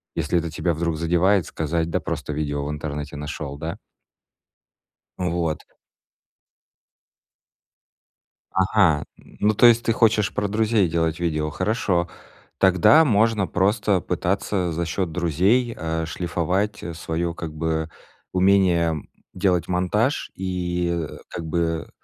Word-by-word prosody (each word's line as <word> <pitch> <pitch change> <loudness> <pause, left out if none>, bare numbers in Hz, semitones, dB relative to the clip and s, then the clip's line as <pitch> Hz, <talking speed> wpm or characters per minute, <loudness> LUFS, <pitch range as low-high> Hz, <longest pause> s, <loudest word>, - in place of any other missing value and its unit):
если 80 +4 0
это 85 -1 -4
тебя 85 +2 -1
вдруг 85 0 -2
задевает, 90 +3 +2
сказать: 80 +1 -2
"Да - - 0
просто 75 - -4
видео 70 -1 -2
в - - -4
интернете 75 -1 -5
нашёл". 75 -1 -5
Да? 80 +2 -5 1.4
Вот. 85 -3 -1 2.9
Ага, 95 -5 +3
ну, 105 +1 -1
то 120 - +5
есть 120 0 +6
ты 115 - +1
хочешь 105 -3 +2
про 105 - 0
друзей 110 -2 +2
делать 80 0 -1
видео. 75 -3 -1
Хорошо. 90 -1 0 0.5
Тогда 95 - +6
можно 110 -5 +2
просто 100 0 +1
пытаться 90 +1 -1
за 85 +2 -2
счёт 85 +1 -2
друзей, 95 - +1
э, 80 0 -2
шлифовать 90 +5 -2
своё 85 +1 -3
как 80 -2 -6
бы 80 0 -2 0.4
умение 90 -5 +3 0.3
делать 90 -2 +1
монтаж 95 - 0
и, 90 -2 -2 0.2
э, - - -10
как 85 - -6
бы 80 0 -1
85 Hz, 120 wpm, -23 LUFS, 80-100 Hz, 2.9 s, есть